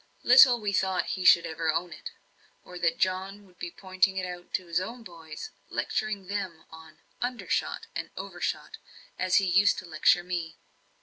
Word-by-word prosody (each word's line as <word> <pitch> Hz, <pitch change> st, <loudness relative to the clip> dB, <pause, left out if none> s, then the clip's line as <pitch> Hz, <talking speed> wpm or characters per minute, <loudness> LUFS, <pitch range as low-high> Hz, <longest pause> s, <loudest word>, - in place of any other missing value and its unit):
Little 250 Hz, -1 st, +8 dB
we 205 Hz, -2 st, -2 dB
thought 190 Hz, -1 st, 0 dB
he 185 Hz, -, -4 dB
should 175 Hz, -1 st, +7 dB
ever 160 Hz, 0 st, -1 dB
own 170 Hz, +2 st, -2 dB
it, -, -, -8 dB, 0.6 s
or 180 Hz, 0 st, -9 dB
that 165 Hz, -1 st, +1 dB
John 190 Hz, +2 st, -2 dB
would 180 Hz, -2 st, -24 dB
be 175 Hz, -, -4 dB
pointing 190 Hz, +1 st, 0 dB
it 185 Hz, -, -1 dB
out 180 Hz, -1 st, -8 dB
to 185 Hz, -, -3 dB
his 170 Hz, 0 st, 0 dB
own 230 Hz, +5 st, -7 dB
boys, 165 Hz, -5 st, -9 dB, 0.2 s
lecturing 215 Hz, -3 st, -2 dB
them 185 Hz, -4 st, -5 dB
on 160 Hz, -1 st, -13 dB, 0.2 s
"undershot," 245 Hz, 0 st, -2 dB
and -, -, -4 dB
"overshot," -, -, -4 dB, 0.4 s
as 185 Hz, 0 st, +1 dB
he 195 Hz, -, +5 dB
used 195 Hz, +3 st, +4 dB
to -, -, -6 dB
lecture 170 Hz, +1 st, +3 dB
me. 175 Hz, -2 st, -4 dB
185 Hz, 175 wpm, -28 LUFS, 170-195 Hz, 0.6 s, Little